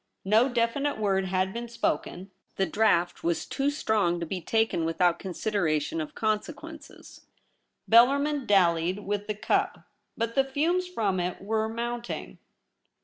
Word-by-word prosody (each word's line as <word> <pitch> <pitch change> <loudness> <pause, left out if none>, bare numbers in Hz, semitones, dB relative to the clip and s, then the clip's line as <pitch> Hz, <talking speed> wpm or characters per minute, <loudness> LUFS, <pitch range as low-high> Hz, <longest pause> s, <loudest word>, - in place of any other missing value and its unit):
No 220 +6 +4
definite 245 +4 0
word 195 -3 +1
had 185 +1 0
been 235 0 -5
spoken. 190 -4 -3 0.2
The 195 - +1
draught 185 -5 +1
was 170 0 0
too 275 +1 -1
strong 210 -11 0
to 170 - -3
be 180 +2 -4
taken 220 -1 +1
without 170 +1 +1
consideration 165 -6 -1
of 155 - -7
consequences. 295 +9 -5 0.6
Bellarmin 280 +4 +4
dallied 180 0 +2
with 205 0 -2
the 210 - -2
cup; 210 - 0 0.3
but 230 0 -2
the 270 - +3
fumes 325 +7 0
from 205 - -1
it 180 0 -2
were 220 +2 -1
mounting. 235 +1 -5
215 Hz, 140 wpm, -27 LUFS, 180-240 Hz, 0.6 s, No